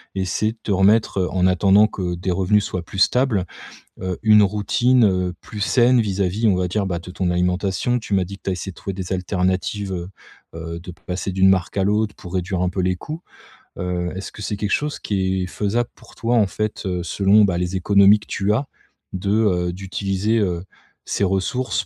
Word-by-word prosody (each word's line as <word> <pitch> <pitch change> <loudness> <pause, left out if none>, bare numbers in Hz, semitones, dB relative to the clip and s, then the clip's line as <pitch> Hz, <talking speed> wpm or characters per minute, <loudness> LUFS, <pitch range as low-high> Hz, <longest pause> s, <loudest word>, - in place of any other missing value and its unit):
essayer 95 +3 -1
de - - -29
te - - -2
remettre, 100 +2 +3
heu, 90 - 0
en 90 -1 +1
attendant 95 +3 +5
que 90 -4 -3
des 90 +2 -2
revenus 95 +3 +2
soient 90 - -3
plus 90 +3 -10
stables, 110 -1 +2 0.6
heu, 95 -1 -3
une 105 -1 +6
routine, 115 +5 +2
heu, 90 -3 +1
plus 105 - -8
saine 120 +3 +4
vis-à-vis, 100 +1 0
on 100 - +4
va 90 0 0
dire, 100 +3 -1
bah, 90 -2 -2
de 85 - -10
ton 90 0 -1
alimentation? 90 +6 0
Tu 110 -3 -3
m'as 95 -1 +2
dit 100 +2 -9
que - - -50
tu - - -3
as - - +1
essayé 95 +1 -6
de - - -23
trouver 100 - -5
des 95 0 -5
alternatives, 95 +2 -1
heu 90 -1 -4 0.5
heu, 85 0 -6
de 90 +1 -9
passer 90 +2 -5
d'une 95 0 +4
marque 95 0 0
à 95 - +2
l'autre 105 +1 +1
pour 90 -3 -11
réduire 90 0 -1
un 90 - +1
peu 95 - -3
les 90 0 +1
coûts. 155 - -7 0.6
Heu, 90 -1 -2
est-ce 95 - -6
que - - -11
c'est 105 - -2
quelque 105 0 -3
chose 150 0 0
qui 95 -2 -1
est - - -4
faisable 110 +5 -1
pour - - -18
toi, 115 +1 0
en 105 -3 +4
fait, 105 +3 -4
heu, 90 -2 -2
selon, 100 +4 +4
bah 95 -4 +1
les 90 +1 -2
économies 100 +2 +5
que - - -15
tu 100 +1 0
as 135 +6 -1 0.5
de, 95 +1 -3
heu, 90 -5 +1
d'utiliser, 95 +3 -1
heu, 90 -4 -1 0.4
ces 100 - -1
ressources 95 +7 -1
95 Hz, 215 wpm, -21 LUFS, 90-105 Hz, 0.6 s, une